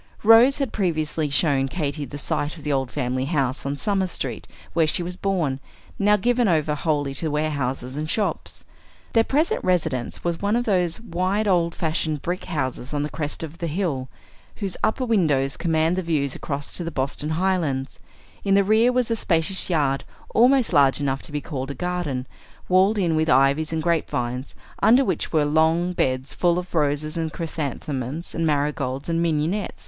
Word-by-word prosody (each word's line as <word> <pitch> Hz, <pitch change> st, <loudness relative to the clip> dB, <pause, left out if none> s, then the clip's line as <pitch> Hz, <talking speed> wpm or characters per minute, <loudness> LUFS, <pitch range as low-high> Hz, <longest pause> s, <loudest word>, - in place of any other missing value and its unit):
Rose 225 Hz, +5 st, +7 dB
had 275 Hz, -5 st, -2 dB
previously 155 Hz, -5 st, -1 dB
shown 140 Hz, -1 st, +2 dB
Katy 145 Hz, -1 st, -3 dB
the 140 Hz, +2 st, -8 dB
site 145 Hz, +3 st, -2 dB
of 155 Hz, -, -12 dB
the 150 Hz, -, -1 dB
old 135 Hz, -2 st, 0 dB
family 125 Hz, +1 st, -2 dB
house 140 Hz, -3 st, -1 dB
on 140 Hz, +1 st, -2 dB
Summer 195 Hz, +2 st, +1 dB
Street, 175 Hz, -, -4 dB, 0.3 s
where 165 Hz, -2 st, +3 dB
she 175 Hz, -, +1 dB
was 180 Hz, +1 st, -5 dB
born, 175 Hz, -9 st, -1 dB, 0.4 s
now 210 Hz, +1 st, +4 dB
given 240 Hz, +3 st, +2 dB
over 155 Hz, -4 st, +2 dB
wholly 145 Hz, -2 st, -1 dB
to 155 Hz, +4 st, -2 dB
warehouses 140 Hz, -4 st, -2 dB
and 155 Hz, +1 st, -3 dB
shops. 210 Hz, +5 st, -2 dB, 0.5 s
Their 225 Hz, -, +5 dB
present 300 Hz, +7 st, 0 dB
residence 160 Hz, -9 st, -1 dB
was 170 Hz, -1 st, -2 dB
one 205 Hz, +2 st, +1 dB
of 240 Hz, 0 st, 0 dB
those 180 Hz, -4 st, +1 dB
wide 200 Hz, 0 st, -1 dB
old 170 Hz, -3 st, +2 dB
fashioned 155 Hz, -3 st, -1 dB
brick 180 Hz, +2 st, -3 dB
houses 135 Hz, -3 st, -3 dB
on 145 Hz, -, 0 dB
the 150 Hz, -, -4 dB
crest 150 Hz, 0 st, -3 dB
of 160 Hz, +1 st, -8 dB
the 170 Hz, -, -2 dB
hill, 150 Hz, -6 st, -2 dB, 0.5 s
whose 195 Hz, -4 st, -4 dB
upper 255 Hz, +4 st, +1 dB
windows 150 Hz, -, +2 dB
command 160 Hz, +1 st, +1 dB
the -, -, +1 dB
view 160 Hz, -5 st, 0 dB
across 140 Hz, -2 st, -5 dB
to 175 Hz, -, -1 dB
the 165 Hz, -, -3 dB
Boston 145 Hz, +1 st, -2 dB
Highlands; 165 Hz, -8 st, -1 dB, 0.4 s
in 195 Hz, -1 st, +3 dB
the 200 Hz, -, +5 dB
rear 220 Hz, +5 st, +4 dB
was 250 Hz, -2 st, 0 dB
a -, -, +2 dB
spacious 185 Hz, -2 st, +1 dB
yard, 145 Hz, -5 st, +1 dB, 0.3 s
almost 250 Hz, -1 st, +4 dB
large 140 Hz, -4 st, +5 dB
enough 135 Hz, -1 st, -1 dB
to -, -, -9 dB
be 150 Hz, 0 st, -2 dB
called 135 Hz, -3 st, -5 dB
a 140 Hz, -, -5 dB
garden, 175 Hz, -6 st, -2 dB, 0.4 s
walled 190 Hz, +4 st, +4 dB
in 170 Hz, -5 st, +1 dB
with 160 Hz, 0 st, +1 dB
ivies 140 Hz, +4 st, +3 dB
and 160 Hz, -1 st, -2 dB
grapevines, 130 Hz, -6 st, -1 dB, 0.3 s
under 245 Hz, +6 st, +5 dB
which -, -, -1 dB
were 155 Hz, -3 st, +3 dB
long 160 Hz, +4 st, +2 dB
beds 130 Hz, -3 st, -1 dB
full 175 Hz, +1 st, +2 dB
of 180 Hz, 0 st, -5 dB
roses 150 Hz, 0 st, 0 dB
and 160 Hz, -1 st, -2 dB
chrysanthemums 150 Hz, -2 st, -4 dB
and 165 Hz, -1 st, 0 dB
marigolds 140 Hz, -2 st, -1 dB
and 165 Hz, 0 st, 0 dB
mignonette. 165 Hz, +5 st, -1 dB
160 Hz, 185 wpm, -23 LUFS, 140-185 Hz, 0.5 s, Rose